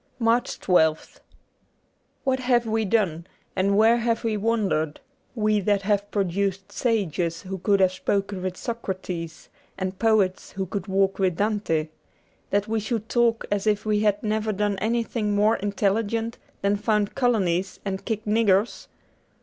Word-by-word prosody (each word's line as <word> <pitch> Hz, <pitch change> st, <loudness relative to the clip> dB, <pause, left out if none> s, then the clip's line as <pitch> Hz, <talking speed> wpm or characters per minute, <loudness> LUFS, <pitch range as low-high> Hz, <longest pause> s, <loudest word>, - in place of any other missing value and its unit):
n 230 Hz, -, -1 dB
MARCH 235 Hz, +2 st, +1 dB
1 160 Hz, -4 st, +5 dB
2th -, -, -20 dB, 1.0 s
WHAT 265 Hz, -1 st, +1 dB
have 245 Hz, -2 st, +2 dB
we 220 Hz, 0 st, 0 dB
done, 185 Hz, -6 st, 0 dB, 0.3 s
and 200 Hz, +1 st, +2 dB
where 225 Hz, +2 st, +5 dB
have 230 Hz, -1 st, 0 dB
we 225 Hz, -2 st, 0 dB
wandered, 200 Hz, -8 st, 0 dB, 0.4 s
we 215 Hz, -2 st, +2 dB
that 200 Hz, 0 st, +1 dB
have 205 Hz, 0 st, 0 dB
produced 195 Hz, -1 st, -1 dB
sages 180 Hz, -, -1 dB
who 190 Hz, 0 st, -5 dB
could 200 Hz, +2 st, +2 dB
have 185 Hz, -1 st, +4 dB
spoken 195 Hz, 0 st, -1 dB
with 185 Hz, -1 st, -3 dB
Socrates 185 Hz, -8 st, -5 dB, 0.3 s
and 185 Hz, 0 st, -4 dB
poets 215 Hz, -5 st, +1 dB
who 190 Hz, 0 st, -2 dB
could 190 Hz, 0 st, -5 dB
walk 195 Hz, 0 st, +1 dB
with 185 Hz, -3 st, +1 dB
Dante, 200 Hz, -7 st, 0 dB, 0.6 s
that 205 Hz, +1 st, +1 dB
we 220 Hz, 0 st, 0 dB
should 220 Hz, +1 st, -3 dB
talk 235 Hz, -2 st, +2 dB
as 205 Hz, +1 st, 0 dB
if 210 Hz, -1 st, +1 dB
we 210 Hz, -1 st, +2 dB
had 210 Hz, -1 st, +1 dB
never 215 Hz, 0 st, 0 dB
done 205 Hz, -1 st, -1 dB
anything 225 Hz, -1 st, -1 dB
more 215 Hz, +2 st, +3 dB
intelligent 210 Hz, +3 st, -1 dB, 0.2 s
than 200 Hz, +1 st, +2 dB
found 210 Hz, -1 st, 0 dB
colonies 195 Hz, -8 st, 0 dB
and 195 Hz, -1 st, -3 dB
kick 220 Hz, -2 st, -3 dB
niggers 210 Hz, -1 st, +2 dB
205 Hz, 155 wpm, -25 LUFS, 190-225 Hz, 1.0 s, 1